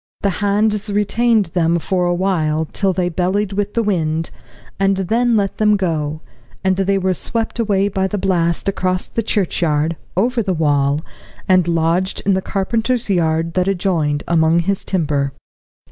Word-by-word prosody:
The 200 - +1
hands 210 +1 +1
retained 210 +2 +2
them 170 -1 +2
for 180 +1 0
a 175 - +1
while 160 -4 0
till 195 +5 -1
they 180 -1 0
bellied 185 +4 -1
with 205 +1 -2
the 230 - +2
wind, 165 -5 -1 0.5
and 195 0 +2
then 230 +5 +1
let 200 -2 -1
them 210 -1 +3
go, 155 -5 -2 0.4
and 190 0 +2
they 195 +1 +1
were 190 -1 +1
swept 225 +5 -3
away 200 -3 +2
by 190 -1 -1
the 205 - -3
blast 175 -3 0
across 185 -1 -1
the 230 - -3
churchyard, 165 -7 0 0.2
over 240 +4 +2
the 190 -4 -1
wall, 145 -2 +1 0.5
and 185 -2 +4
lodged 170 +3 0
in 200 - +3
the 190 - +1
carpenter's 225 +4 -1
yard 165 -2 +1
that 185 0 +1
adjoined, 170 -6 0
among 165 0 +3
his 195 +2 -1
timber. 145 -6 -1
185 Hz, 160 wpm, -18 LUFS, 165-200 Hz, 0.5 s, and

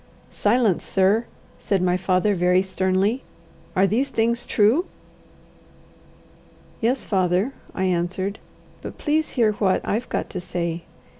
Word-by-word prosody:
"Silence, 215 -3 +2
sir!" 200 +4 +2 0.3
said 195 - 0
my 180 0 +2
father, 185 +2 +1
very 180 0 +3
sternly. 190 +5 0 0.5
"Are 190 - +4
these 245 +8 +1
things 235 0 0
true?" 235 - +3 1.9
"Yes, 245 +3 0
father," 190 +5 +1 0.2
I 190 - -1
answered. 185 +2 -1 0.4
"But - - -8
please 310 0 0
hear 230 -4 +3
what 200 -3 +1
I've 230 +4 -1
got - - -2
to 185 - -4
say. 170 -1 -3
195 Hz, 125 wpm, -23 LUFS, 185-230 Hz, 1.9 s, Are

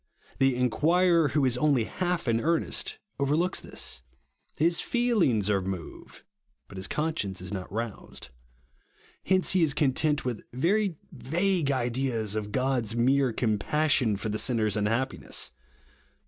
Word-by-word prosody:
The 135 -1 +3
inquirer 165 +7 +3
who 145 -1 +1
is 125 -1 +2
only 140 -5 +3
half 180 +4 -2
in 115 0 +2
earnest 165 +1 -1 0.2
overlooks 150 +6 +1
this. - - -4 0.5
His 170 +2 +2
feelivgs 210 - +1
are 100 -2 +2
moved, 95 -3 -7 0.4
but 95 - -11
his 95 - -3
conscience 150 - -2
is 90 +2 -6
not 95 -2 -5
roused. 110 - -6 1.0
Hence 185 -1 +3
he 185 - +2
is 155 -4 +2
content 150 +1 +1
with 120 -4 -3
very 185 - +1 0.2
vague 175 +1 0
ideas 120 -4 -1
of 105 -1 -3
God's 125 -2 0
mere 130 +2 +3
compassion 115 +1 +1
for 105 +2 -4
the 105 +1 -1
sinner's 110 -4 +1
unhappiness. 105 - -1
130 Hz, 135 wpm, -27 LUFS, 110-160 Hz, 1.0 s, The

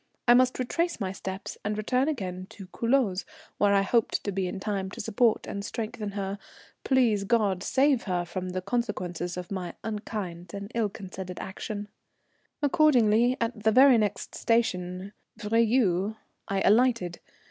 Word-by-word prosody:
I 240 - +8
must 255 +1 +4
retrace 335 +7 -1
my 190 -3 -2
steps 190 0 -6
and 210 +1 -2
return 250 +5 +1
again 185 -10 -3
to 195 - -10
Culoz, 230 -6 +1 0.4
where 205 -1 +4
I 195 - +4
hoped 230 +3 +1
to 200 - -2
be 190 -1 -1
in 185 - -5
time 195 -2 -2
to 220 - -10
support 225 +1 +2
and 200 - -5
strengthen 215 -1 -4
her, 200 0 -3 0.4
please 240 -7 +3
God 200 -4 +1
save 265 +3 +2
her 180 -3 -1
from 185 +1 -4
the 185 0 -3
consequences 185 -6 -2
of 180 +1 -6
my 180 -3 -4
unkind 200 -5 -5
and 200 +2 -7
ill 225 -3 +1
considered 190 -2 -8
action. 205 +2 -5 0.8
Accordingly, 255 -6 +4
at 230 -1 -2
the 220 +1 +3
very 260 0 +7
next 210 -2 -2
station, 190 -4 0 0.3
Virieu, 215 -3 +2 0.3
I 195 -1 0
alighted. 220 -6 +3
210 Hz, 155 wpm, -27 LUFS, 190-235 Hz, 0.8 s, I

